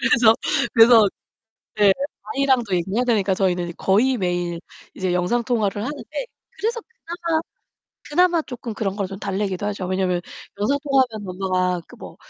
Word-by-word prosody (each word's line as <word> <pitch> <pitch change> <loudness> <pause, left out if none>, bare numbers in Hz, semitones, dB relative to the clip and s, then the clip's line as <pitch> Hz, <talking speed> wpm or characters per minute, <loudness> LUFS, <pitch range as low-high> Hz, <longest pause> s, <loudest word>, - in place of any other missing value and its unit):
그래서 230 -2 +5 0.4
그래서 225 -2 +7 0.7
네 205 -2 +6 0.4
아이랑도 260 -8 +2
얘기해야 195 +8 0
되니까 205 -6 +2
저희는 180 -2 0
거의 235 +7 +2
매일 175 -4 -2 0.3
이제 185 -1 -2
영상통화를 210 +2 0
하는데 295 - -5 0.3
그래서 465 +2 -2 1.3
그나마 345 +1 +3
조금 240 -4 -7
그런걸 200 -2 -2
좀 195 0 -8
달래기도 195 0 -2
하죠. 200 -3 -3
왜냐하면 185 -1 0 0.4
영상통화하면 260 -4 +1
엄마가 185 -1 -1 0.2
뭐 - - -10
205 Hz, 325 characters per minute, -22 LUFS, 185-245 Hz, 1.3 s, 그래서